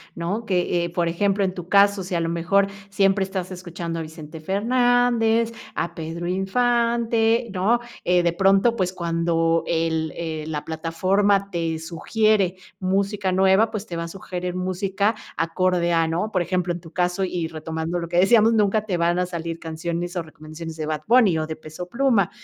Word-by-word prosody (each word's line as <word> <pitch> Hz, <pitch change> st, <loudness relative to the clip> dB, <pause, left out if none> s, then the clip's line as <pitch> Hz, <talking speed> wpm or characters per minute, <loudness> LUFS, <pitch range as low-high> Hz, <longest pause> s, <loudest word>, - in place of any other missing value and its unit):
¿no? 195 Hz, +7 st, -3 dB
Que, 180 Hz, -3 st, +1 dB
eh -, -, -4 dB
por 170 Hz, 0 st, -1 dB
ejemplo, 195 Hz, +4 st, +1 dB
en 185 Hz, -1 st, 0 dB
tu 180 Hz, -2 st, -8 dB
caso, 200 Hz, -1 st, +4 dB
si 180 Hz, 0 st, -4 dB
a -, -, +1 dB
lo 165 Hz, 0 st, -1 dB
mejor 175 Hz, +4 st, +2 dB, 0.2 s
siempre 195 Hz, 0 st, +2 dB
estás 190 Hz, -1 st, -4 dB
escuchando 175 Hz, -2 st, -5 dB
a -, -, -3 dB
Vicente 160 Hz, 0 st, -9 dB
Fernández, 230 Hz, +3 st, +2 dB, 0.2 s
a 170 Hz, -, -3 dB
Pedro 165 Hz, +1 st, -5 dB
Infante, 230 Hz, +3 st, +1 dB
¿no?, 205 Hz, +6 st, +2 dB, 0.2 s
eh 180 Hz, 0 st, +3 dB
de 170 Hz, -1 st, +2 dB
pronto, 195 Hz, +5 st, +3 dB
pues 185 Hz, -4 st, -1 dB
cuando 165 Hz, -1 st, +1 dB
el 160 Hz, -2 st, 0 dB
eh, 160 Hz, -2 st, -4 dB
la 150 Hz, -2 st, -4 dB
plataforma 190 Hz, +5 st, +1 dB
te 165 Hz, -2 st, -1 dB
sugiere 190 Hz, +4 st, +1 dB, 0.2 s
música 195 Hz, +1 st, 0 dB
nueva, 190 Hz, +4 st, +4 dB
pues, 215 Hz, -1 st, -4 dB
te 170 Hz, -, -6 dB
va 170 Hz, -, -2 dB
a -, -, -5 dB
sugerer 180 Hz, 0 st, -5 dB
música 190 Hz, +3 st, 0 dB, 0.2 s
acorde 175 Hz, +1 st, +1 dB
a 165 Hz, -1 st, +3 dB
¿no? 175 Hz, +7 st, -1 dB
Por 185 Hz, -, +1 dB
ejemplo, 180 Hz, 0 st, -1 dB
en 170 Hz, -, -6 dB
tu 165 Hz, -2 st, -13 dB
caso 180 Hz, +2 st, 0 dB
y 175 Hz, -3 st, -2 dB
retomando 160 Hz, +2 st, -4 dB
lo 170 Hz, -, -4 dB
que 175 Hz, +1 st, -2 dB
decíamos, 220 Hz, +4 st, +5 dB
nunca 215 Hz, 0 st, +2 dB
te 190 Hz, -5 st, -1 dB
van 170 Hz, +1 st, +1 dB
a 180 Hz, -, +1 dB
salir 165 Hz, -2 st, -5 dB
canciones, 170 Hz, +2 st, -4 dB
o 175 Hz, -, 0 dB
recomendaciones 155 Hz, +1 st, -9 dB
de 155 Hz, -, -3 dB
Bad 155 Hz, -1 st, -2 dB
Bunny, 225 Hz, -7 st, +5 dB
o 155 Hz, 0 st, -2 dB
de 160 Hz, -, -4 dB
Peso 155 Hz, +3 st, -9 dB
Pluma, 235 Hz, -4 st, +2 dB
180 Hz, 185 wpm, -23 LUFS, 165-200 Hz, 0.2 s, decíamos